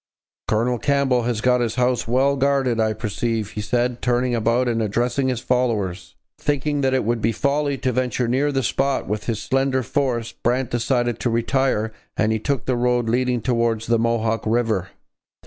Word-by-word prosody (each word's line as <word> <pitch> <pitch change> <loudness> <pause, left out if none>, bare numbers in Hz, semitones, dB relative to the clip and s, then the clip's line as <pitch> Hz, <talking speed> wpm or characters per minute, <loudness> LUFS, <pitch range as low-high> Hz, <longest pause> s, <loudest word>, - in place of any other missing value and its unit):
'Colonel 120 +3 +1
Campbell 140 -3 +2
has 120 -3 -1
got 125 0 +3
his 115 -2 -1
house 125 -2 +1
well 135 +4 +2
guarded, 135 -3 +1
I 110 -1 +2
perceive,' 110 0 -2
he 105 - -4
said, 120 +2 -1
turning 125 0 +1
about 115 +2 +1
and 115 -1 0
addressing 120 +5 0
his 125 -3 -1
followers. 110 -8 -1 0.2
Thinking 145 0 0
that 130 -1 +2
it 130 - +1
would 115 +1 -1
be 115 - +2
folly 140 +3 0
to 130 0 -1
venture 125 0 -1
near 135 +5 +1
the 135 -1 0
spot 135 +3 0
with 105 +1 -3
his 115 -3 -2
slender 135 +2 0
force, 120 -2 -1
Brant 125 +1 -1
decided 120 -1 0
to 120 - 0
retire 115 -1 0 0.2
and 110 0 +2
he 110 - 0
took 135 +3 -2
the 130 - 0
road 120 -1 +1
leading 125 0 +1
towards 115 -2 0
the 115 0 +2
Mohawk 115 -1 0
river. 110 -5 0
120 Hz, 180 wpm, -22 LUFS, 115-130 Hz, 0.2 s, got